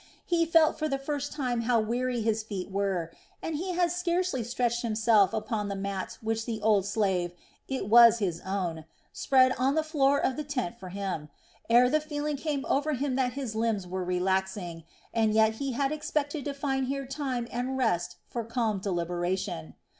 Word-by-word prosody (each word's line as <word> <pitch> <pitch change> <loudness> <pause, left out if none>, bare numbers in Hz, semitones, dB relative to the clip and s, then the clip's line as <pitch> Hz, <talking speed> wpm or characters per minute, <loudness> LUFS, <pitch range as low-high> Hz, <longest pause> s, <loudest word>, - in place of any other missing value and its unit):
He 335 -2 +2
felt 325 -1 +4
for 310 -1 0
the 275 - 0
first 285 +1 -3
time 250 -5 -1
how 235 0 +2
weary 240 +2 -1
his 220 0 +1
feet 200 -3 -6
were, 190 -4 -1 0.3
and 325 - -3
he 360 +4 -2
had 350 -1 +2
scarcely 355 -6 0
stretched 240 0 0
himself 220 -3 +3
upon 215 -1 -2
the 200 - -2
mat 195 -1 -4
which 225 0 -1
the 225 -2 -2
old 205 -3 +3
slave 190 -4 0 0.3
it 265 -7 -3
was 235 +1 +8
his 180 -6 -2
own 180 -5 -3 0.3
spread 260 -1 +4
on 270 +3 +2
the 315 - +2
floor 285 -3 +2
of 260 -2 0
the 300 - -2
tent 265 -11 -3
for 185 - -8
him, 185 -5 -4 0.4
ere 240 +2 +6
the 305 +4 +2
feeling 300 -1 -3
came 280 -1 -2
over 295 +2 +1
him 275 0 -1
that 255 -2 +1
his 260 -5 -4
limbs 220 -3 0
were 185 +1 -3
relaxing; 180 -1 -1 0.3
and 220 -2 +2
yet 220 0 +4
he 275 0 -2
had 275 +3 0
expected 300 -1 -2
to 285 - -2
find 270 -2 -1
here 275 +1 -2
time 260 -3 -3
and 250 +2 -2
rest 225 -10 0
for 235 - -4
calm 225 -3 -1
deliberation. 175 - -2
235 Hz, 185 wpm, -28 LUFS, 200-275 Hz, 0.4 s, was